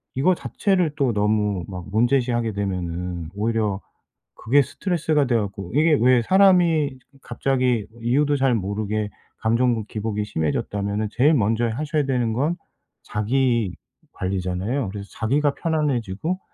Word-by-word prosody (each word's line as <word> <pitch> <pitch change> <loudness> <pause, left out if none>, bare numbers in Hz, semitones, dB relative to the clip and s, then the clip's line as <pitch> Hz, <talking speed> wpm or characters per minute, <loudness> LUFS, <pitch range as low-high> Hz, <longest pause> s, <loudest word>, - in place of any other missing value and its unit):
이거 145 +8 +3
자체를 180 -4 0
또 135 -5 +1
너무 105 -2 +1
막 90 -3 -7
문제시하게 120 0 +1
되면은 90 -4 -3
오히려 105 -2 0 0.6
그게 140 +6 +3
스트레스가 155 -2 0
돼 125 - +1
갖고 100 -3 -4
이게 155 +1 +4
왜 125 0 +5
사람이 175 -6 +4 0.2
갑자기 125 -3 0
뭐 115 +1 -17
이유도 145 +5 +2
잘 130 -2 +2
모르게 105 +1 -2 0.3
감정 115 0 +1
기복이 105 -1 -3
심해졌다면은 100 +5 -2
제일 140 +8 +4
먼저 115 0 +1
하셔야 150 +5 -1
되는 125 -4 0
건 145 +9 0 0.5
자기 115 -1 0 0.4
관리잖아요. 95 +6 -2
그래서 100 0 -7
자기가 140 +6 +1
편안해지고 150 - -1
115 Hz, 310 characters per minute, -23 LUFS, 105-140 Hz, 0.6 s, 왜